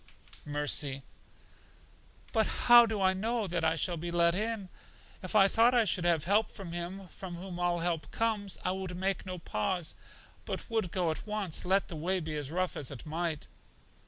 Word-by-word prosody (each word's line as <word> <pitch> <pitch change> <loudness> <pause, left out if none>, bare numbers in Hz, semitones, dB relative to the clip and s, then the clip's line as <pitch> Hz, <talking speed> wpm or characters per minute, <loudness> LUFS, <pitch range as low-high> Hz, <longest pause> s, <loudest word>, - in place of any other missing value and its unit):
Mercy: 145 -2 0 1.3
But 220 -3 +3
how 240 -1 +7
do 220 -2 -2
I 190 -1 +4
know 225 +3 -1
that 175 -3 -2
I 160 0 +3
shall 170 +2 0
be 170 +2 -4
let 170 0 +3
in? 210 0 -2 0.5
If 185 +2 -5
I 195 -2 +7
thought 230 +4 +4
I 235 -2 +5
should 180 -3 +1
have 170 -4 +3
help 210 +4 +2
from 190 -5 -8
Him 175 +3 -5
from 185 -2 -8
whom 180 0 -7
all 175 -1 +1
help 165 -3 -1
comes, 215 -4 -1
I - - +2
would 190 -1 -4
make 190 +1 -1
no 185 0 -4
pause, 165 - -2 0.5
but - - -5
would 220 -5 0
go 175 -3 +1
at 155 - -6
once, 210 -7 -2
let 190 +2 +2
the 170 - -7
way 180 +5 0
be 155 -2 -4
as 145 -2 -3
rough 185 +3 -1
as 135 - -3
it 135 -4 -8
might. 160 -1 -2
180 Hz, 190 wpm, -31 LUFS, 165-200 Hz, 1.3 s, how